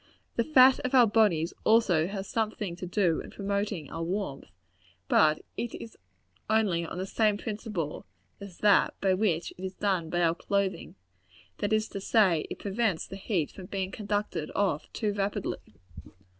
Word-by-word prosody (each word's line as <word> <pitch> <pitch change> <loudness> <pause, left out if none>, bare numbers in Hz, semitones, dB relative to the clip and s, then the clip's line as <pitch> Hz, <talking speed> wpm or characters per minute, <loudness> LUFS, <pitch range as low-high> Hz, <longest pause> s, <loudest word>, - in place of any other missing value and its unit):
The 235 - +2
fat 265 -2 +6
of 255 +1 -1
our 250 -2 +8
bodies 205 -7 +2
has - - -25
also 195 -4 +3
something 215 -4 -2
to 180 +1 -7
do 175 -3 +1
in - - -10
promoting 200 -5 -3
our 165 - -5
warmth; 175 -4 -3 0.6
but 155 +6 +4
it 235 - -3
is 225 - -9 0.5
only 210 -6 +2
on 165 - -6
the 185 - -2
same 210 +1 +1
principle 210 -8 -5 0.3
as 200 -3 -10
that 205 -2 +4
by 190 -1 +2
which 185 -4 0
it - - -8
is 190 0 -5
done 185 -5 0
by 175 +1 0
our 165 -1 +3
clothing; 200 +2 -2 0.6
that 205 - -1
is 215 0 +2
to 195 - -6
say, 190 -7 +3
it - - -5
prevents 200 -3 -1
the - - -9
heat 190 -6 -1
from 185 -2 -10
being 190 -1 -3
conducted 205 -7 -3
off 195 -7 0
too 210 -2 -1
rapidly. 200 - -3
200 Hz, 170 wpm, -28 LUFS, 175-215 Hz, 0.6 s, our